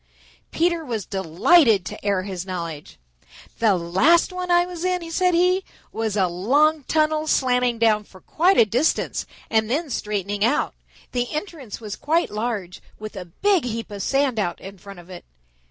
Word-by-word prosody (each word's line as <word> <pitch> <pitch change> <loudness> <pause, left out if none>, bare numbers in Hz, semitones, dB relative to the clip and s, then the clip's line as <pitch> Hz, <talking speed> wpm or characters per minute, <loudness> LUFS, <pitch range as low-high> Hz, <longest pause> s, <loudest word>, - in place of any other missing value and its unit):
Peter 340 0 0
was 230 -8 -4
delighted 195 - +3
to - - -8
air 200 -2 0
his 185 -2 -5
knowledge. 170 -5 -6 0.6
"The 220 -4 +4
last 215 - +3
one 365 0 -4
I 350 0 +4
was 355 -1 -7
in," 360 -2 -2
said 360 +1 +2
he, 365 +2 +3 0.3
"was 220 -2 -2
a 190 - +3
long 280 - +2
tunnel 310 0 +1
slanting 250 -4 +2
down 215 -2 +2
for 190 - -17
quite 360 - +2
a - - +7
distance 250 +9 0 0.2
and 220 -1 +2
then 295 +3 -1
straightening 205 -2 -2
out. 240 +6 +1 0.4
The 245 -1 -2
entrance 305 - -6
was 215 -3 -6
quite 325 +3 0
large 210 -4 -4 0.2
with 215 0 -8
a 185 -2 -6
big 375 - +1
heap 230 -2 -5
of 200 -1 -6
sand 270 0 +1
out 175 -4 -2
in 195 0 -11
front 200 +1 -11
of 175 +1 -13
it. 175 - -9
230 Hz, 170 wpm, -22 LUFS, 200-315 Hz, 0.6 s, a